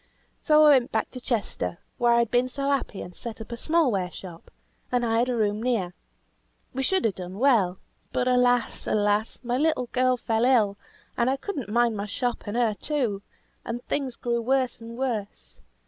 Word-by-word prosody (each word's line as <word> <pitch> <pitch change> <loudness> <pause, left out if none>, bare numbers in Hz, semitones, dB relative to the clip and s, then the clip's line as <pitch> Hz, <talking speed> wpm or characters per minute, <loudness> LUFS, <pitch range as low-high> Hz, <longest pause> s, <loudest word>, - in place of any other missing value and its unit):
So 305 -1 +5
I 305 - +8
went 260 -4 +4
back 220 - -1
to 255 - -8
Chester, 195 - -2 0.2
where 240 0 +4
I'd 235 -1 +2
been 245 +1 +3
so 275 +2 -3
happy, 270 -7 -2
and 180 - -11
set 235 -1 -6
up 220 +1 -9
a - - -3
small 310 +2 +2
ware 185 -3 -1
shop, 175 -3 -11 0.4
and 245 -1 +1
hired 230 +2 +2
a 250 - 0
room 210 -1 0
near. 225 -8 0 0.8
We 265 - -2
should 375 +5 +1
have 220 - +2
done 185 +1 -8
well, 215 -8 +3 0.3
but 250 - 0
alas! 245 -1 +2
alas! 210 +1 +1
my 245 +1 -1
little 305 -5 +1
girl 255 0 +2
fell 225 -1 0
ill, 225 -6 +3 0.4
and 240 +1 +2
I 270 - +1
could 400 +9 -5
not 245 -7 -4
mind 235 0 +2
my 200 +1 -3
shop 245 +3 -2
and 205 +3 -2
her 235 -3 +2
too; 235 -5 -2 0.4
and 240 +1 -5
things 270 -4 -2
grew 235 0 -1
worse 255 0 0
and 230 +1 -9
worse. 230 -6 -4
240 Hz, 195 wpm, -26 LUFS, 215-255 Hz, 0.8 s, I